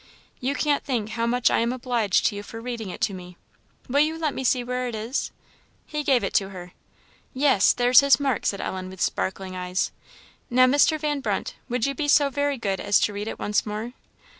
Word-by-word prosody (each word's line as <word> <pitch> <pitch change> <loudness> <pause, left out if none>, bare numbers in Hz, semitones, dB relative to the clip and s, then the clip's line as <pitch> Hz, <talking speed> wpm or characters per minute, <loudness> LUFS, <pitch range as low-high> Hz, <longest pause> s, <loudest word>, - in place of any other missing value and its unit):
You 270 +3 -1
can't 290 -1 +1
think 235 -6 -2
how 230 +1 -2
much 245 +1 +2
I - - +2
am 235 +1 +1
obliged 240 -6 0
to 210 - +2
you 205 - -5
for 225 +2 -9
reading 230 -3 -5
it - - -8
to 200 - +1
me. 180 -1 -10 0.5
Will 275 +3 +1
you 310 +2 +2
let 310 -3 -1
me 265 - -4
see 250 0 +2
where 250 +1 -2
it 240 - -4
is?" 225 +5 -3 0.6
He 300 -1 -3
gave 265 -5 +3
it 195 - -3
her. 185 -3 -9 0.6
"Yes, 260 -7 +4
there's 245 +1 +5
his 280 0 +5
mark!" 270 -5 0
said 200 - -1
Ellen, 185 0 -4
with 190 -1 -11
sparkling 190 0 -2
eyes. 180 0 -2 0.6
"Now, 255 +1 +5
Mr. 290 +4 +3
Van 295 -1 -1
Brunt, 275 - -2 0.2
would 245 -1 0
you 275 - -1
be 290 +2 -3
so 285 -1 +4
very 285 0 0
good 195 -5 -2
as 205 0 +3
to 210 - +1
read 205 +1 -5
it - - -5
once 210 0 0
more?" 215 +3 -5
240 Hz, 215 wpm, -24 LUFS, 205-275 Hz, 0.6 s, there's